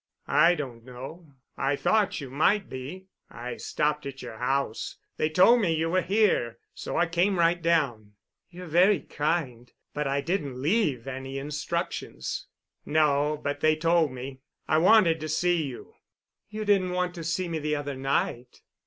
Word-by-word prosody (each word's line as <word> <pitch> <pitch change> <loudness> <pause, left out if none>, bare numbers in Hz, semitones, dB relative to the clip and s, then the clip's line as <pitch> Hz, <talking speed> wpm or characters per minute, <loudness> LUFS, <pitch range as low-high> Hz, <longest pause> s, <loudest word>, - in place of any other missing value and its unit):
"I 170 +4 +4
don't 125 -7 -6
know. 135 +5 -10 0.2
I 135 +1 +1
thought 210 +6 +1
you 135 -4 -7
might 190 +8 +2
be. 140 +9 -7 0.2
I 120 +1 -7
stopped 150 -1 -1
at 135 -1 -8
your 110 - -8
house. 135 -2 -1 0.2
They 155 - +1
told 190 +9 +5
me 170 -5 +1
you 165 +1 0
were 185 +1 +3
here, 180 - +1 0.2
so - - -5
I 175 - +4
came 175 +4 +1
right 170 +1 +3
down." 135 -11 0 0.4
"You're 180 0 -9
very 180 +5 +4
kind—but 145 -2 -3
I 140 +1 0
didn't 145 -6 -2
leave 145 - +1
any 135 0 -5
instructions." 150 +2 -4 0.4
"No, 150 -1 +2
but 145 0 -2
they 155 0 +3
told 165 -1 +2
me. 130 +1 -7 0.3
I 155 - +3
wanted 175 -3 +5
to 155 0 -5
see 175 +2 +2
you." 130 - -9 0.6
"You 215 0 -5
didn't 190 -3 +2
want 180 0 -1
to 170 -2 -7
see 170 +3 -1
me 165 -2 -3
the 150 0 -1
other 145 -1 -3
night." 130 -2 -2
155 Hz, 160 wpm, -27 LUFS, 135-175 Hz, 0.6 s, told